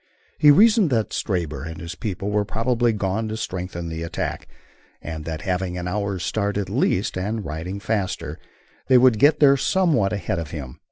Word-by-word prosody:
He 150 Hz, -, +7 dB
reasoned 210 Hz, +3 st, +6 dB
that 115 Hz, -5 st, 0 dB
Stabber 85 Hz, -7 st, -2 dB
and 80 Hz, 0 st, -7 dB
his 85 Hz, +2 st, -6 dB
people 100 Hz, 0 st, -4 dB
were 105 Hz, 0 st, +2 dB
probably 115 Hz, +3 st, +1 dB
gone 105 Hz, +1 st, -1 dB
to 110 Hz, -, -4 dB
strengthen 90 Hz, -4 st, -4 dB
the 80 Hz, 0 st, -5 dB
attack, 85 Hz, 0 st, -4 dB, 0.5 s
and 80 Hz, -1 st, -7 dB
that 80 Hz, -1 st, -5 dB
having 90 Hz, -1 st, -2 dB
an 90 Hz, 0 st, -4 dB
hour's 100 Hz, -1 st, -2 dB
start 100 Hz, -1 st, -1 dB
at 100 Hz, -2 st, -3 dB
least, 105 Hz, -4 st, +1 dB
and 105 Hz, +2 st, -3 dB
riding 90 Hz, +6 st, -5 dB
faster, 100 Hz, -2 st, -3 dB, 0.5 s
they 130 Hz, -, +6 dB
would 125 Hz, -3 st, +5 dB
get 145 Hz, +3 st, +5 dB
there 140 Hz, -2 st, +6 dB
somewhat 155 Hz, -, +2 dB
ahead 100 Hz, -5 st, -2 dB
of 80 Hz, -3 st, -5 dB
him. 70 Hz, -6 st, -7 dB
100 Hz, 180 wpm, -23 LUFS, 90-115 Hz, 0.5 s, He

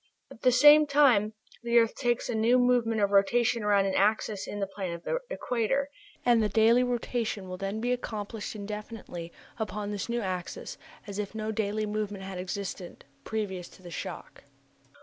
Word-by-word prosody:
At -, -, -13 dB
the 255 Hz, -, +5 dB
same 295 Hz, +4 st, +7 dB
time 255 Hz, -8 st, +4 dB, 0.3 s
the 235 Hz, 0 st, +2 dB
earth 230 Hz, -1 st, +4 dB
takes 240 Hz, -2 st, 0 dB
a -, -, -2 dB
new 225 Hz, +3 st, +3 dB
movement 245 Hz, -3 st, +2 dB
of 200 Hz, 0 st, +2 dB
rotation 230 Hz, +4 st, +3 dB
around 205 Hz, -1 st, +3 dB
an 195 Hz, -, 0 dB
axis 210 Hz, 0 st, +1 dB
in 205 Hz, -, -5 dB
the 200 Hz, -, 0 dB
plane 190 Hz, -2 st, -5 dB
of 170 Hz, -, -8 dB
the -, -, -1 dB
equator, 270 Hz, -, -1 dB, 0.3 s
and 240 Hz, -2 st, +5 dB
the 210 Hz, -, +1 dB
daily 225 Hz, +4 st, +5 dB
rotation 240 Hz, -4 st, -2 dB
will 185 Hz, 0 st, -6 dB
then 195 Hz, +3 st, -3 dB
be 245 Hz, +2 st, -1 dB
accomplished 220 Hz, -3 st, -4 dB
indefinitely 210 Hz, -4 st, -7 dB, 0.3 s
upon 210 Hz, -1 st, -3 dB
this 205 Hz, +2 st, -4 dB
new 235 Hz, 0 st, -1 dB
axis, 185 Hz, -3 st, -5 dB, 0.3 s
as 200 Hz, -1 st, -6 dB
if 210 Hz, +1 st, -4 dB
no 215 Hz, 0 st, -2 dB
daily 215 Hz, 0 st, -1 dB
movement 210 Hz, -2 st, -3 dB
had 190 Hz, -1 st, -6 dB
existed 185 Hz, -1 st, -6 dB, 0.2 s
previous 190 Hz, -5 st, -3 dB
to 185 Hz, -, -18 dB
the 175 Hz, -, -9 dB
shock. -, -, -7 dB
215 Hz, 180 wpm, -28 LUFS, 200-240 Hz, 0.3 s, same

